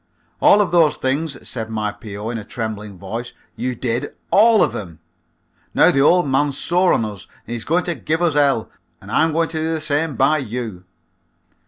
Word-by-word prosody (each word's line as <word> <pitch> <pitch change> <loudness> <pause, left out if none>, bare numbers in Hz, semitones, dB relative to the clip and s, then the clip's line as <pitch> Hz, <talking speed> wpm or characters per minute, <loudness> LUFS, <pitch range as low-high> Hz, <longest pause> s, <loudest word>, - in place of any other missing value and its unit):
"All 205 - +6
of 190 -4 0
those 165 -4 +4
things," 140 +2 -2
said 110 -2 -4
my 110 -1 -2
P.O. 105 +1 -7
in 115 - -4
a - - -8
trembling 105 -3 -6
voice, 115 +6 -6 0.2
"you 125 0 -3
did. 120 0 -3 0.2
All 220 +1 +6
of - - -1
'em. 85 -6 -7 0.8
Now - - +6
the 135 - +2
old 175 +2 +4
man's 140 +1 +1
sore 180 +2 +2
on 115 - +2
us 100 -3 -8 0.2
and 115 - -6
he's 115 -2 -5
going 175 +3 +1
to 175 - -2
give 160 0 -2
us 175 -3 +2
hell, 140 -6 +2 0.3
and - - -12
I'm 160 0 +3
going 165 +1 0
to 160 - -3
do 160 +1 -1
the - - -3
same 150 0 -1
by 155 +6 +3
you." 115 -7 -5
135 Hz, 200 wpm, -20 LUFS, 110-160 Hz, 0.8 s, All